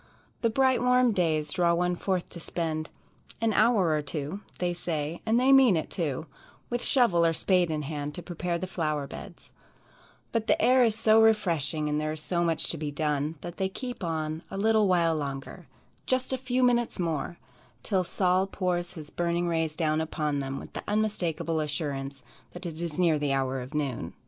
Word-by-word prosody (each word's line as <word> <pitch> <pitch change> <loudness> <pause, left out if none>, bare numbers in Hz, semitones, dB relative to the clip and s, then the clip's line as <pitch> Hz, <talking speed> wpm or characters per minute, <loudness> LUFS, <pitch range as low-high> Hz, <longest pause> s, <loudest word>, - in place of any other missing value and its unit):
The 230 - +3
bright 260 +2 +3
warm 250 -1 +4
days 155 -6 0
draw 175 -2 +3
one 180 +1 +1
forth 185 0 -1
to 170 - -9
spend 160 -1 -3 0.5
"an 225 -1 +1
hour 210 -4 +4
or 155 -1 +1
two" 150 +5 -4 0.2
they 175 -1 0
say, 165 -2 -3
and 225 +2 +4
they 260 +2 +4
mean 260 -9 +6
it 160 - -4
too 155 -3 -2 0.5
with 240 0 -1
shovel 230 -11 +4
or 165 0 +3
spade 180 +1 +2
in 155 -1 -2
hand 145 0 -4
to 175 - -7
prepare 175 -1 -3
the 185 - -4
flower 155 -6 -2
beds, - - -11 0.8
but 225 -1 -1
the - - +3
air 255 +1 +5
is 225 -3 +2
so 220 0 +5
refreshing, 170 -9 +2
and 150 0 0
there 155 0 -1
is 155 - -6
so 175 0 0
much 165 -2 +1
to 165 - -4
be 150 -1 -2
done, 150 +1 -1
that 175 0 -7
they 190 -1 0
keep 245 +2 -6
on 160 -1 -2
"a - - -6
little 215 0 +3
while 170 -3 +3
longer," 140 -2 -5 0.4
"just 260 0 +1
a - - +3
few 255 0 0
minutes 240 -1 +2
more," 170 -1 -2 0.5
till 190 -3 +1
Sol 185 +1 +1
pours 180 -3 -2
his 155 -2 -9
burning 175 0 0
rays 160 -2 0
down 155 -1 +1
upon 150 -2 -1
them 135 0 -3
with - - -11
the - - -5
unmistakable 185 -6 0
assurance 140 -3 -3 0.3
that 175 +1 -8
it 165 -1 -4
is 170 -2 -4
near 165 -4 +3
the 145 -2 0
hour 135 -1 -1
of 130 +5 -8
noon. 135 - -2
170 Hz, 195 wpm, -28 LUFS, 155-200 Hz, 0.8 s, mean